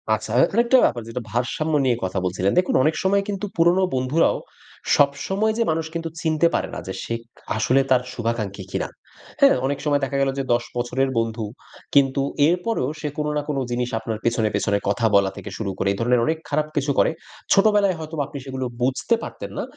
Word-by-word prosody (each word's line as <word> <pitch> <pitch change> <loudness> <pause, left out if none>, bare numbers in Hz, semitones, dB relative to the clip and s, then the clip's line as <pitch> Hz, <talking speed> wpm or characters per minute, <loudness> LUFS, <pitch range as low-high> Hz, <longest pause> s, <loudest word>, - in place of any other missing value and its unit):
আচ্ছা 110 0 -7
এখানে 230 - +2
একটা 260 +2 +5
ব্যাপার 120 -1 0
যেটা 125 +2 -4
ভারসাম্য 125 +7 -1
নিয়ে 125 -2 +3
কথা 95 +1 -1
বলছিলেন 90 +2 0
দেখুন 180 - 0
অনেক 155 +3 +2
সময় 200 +1 +3
কিন্তু 200 0 -3
পুরনো 175 +3 +4
বন্ধুরাও, 130 +5 +2 0.6
সবসময় 145 +10 +1
যে 235 - +3
মানুষ 160 0 -1
কিন্তু 165 -1 -3
চিনতে 160 0 +3
পারে - - 0
না - - -4
যে - - -4
সে - - -4 0.2
খা - - -20 0.2
আসলে 130 +5 +3
তার 125 -1 +5
শুভাকাঙ্ক্ষী 110 -4 -3
কিনা। - - -2 0.5
হ্যাঁ? - - +7
অনেক 140 +1 -1
সময় 145 -1 +2
দেখা 140 +1 -1
গেলো 135 0 +2
যে - - 0
১০ 120 0 +1
বছরের 125 +2 0
বন্ধু 115 -1 -2 0.5
কিন্তু 135 -1 +4 0.3
এরপরেও 180 - 0
সে 150 - -3
কোনো 150 0 -1
না - - +1
কোনো 140 -2 0
জিনিস 125 0 -1
আপনার 110 -1 -4
পেছনে, 115 -2 +2
পেছনে 100 0 +1
কথা 105 +3 0
বলা 100 -1 +4
থেকে - - -7
শুরু 100 -3 -3
করে। 100 - -1
এইধরনের 115 +3 +2
অনেক 160 0 0
খারাপ 150 +1 0
কিছু 145 -1 +1
করে। - - +4 0.4
ছোটবেলায় 200 -2 +4
হয়তোবা 155 -1 -3
আপনি 145 -1 -8
সেগুলো 130 -1 -4 0.2
বুঝতে 130 - +1
পারতেন - - -7
না। - - -1
135 Hz, 195 wpm, -23 LUFS, 115-160 Hz, 0.6 s, হ্যাঁ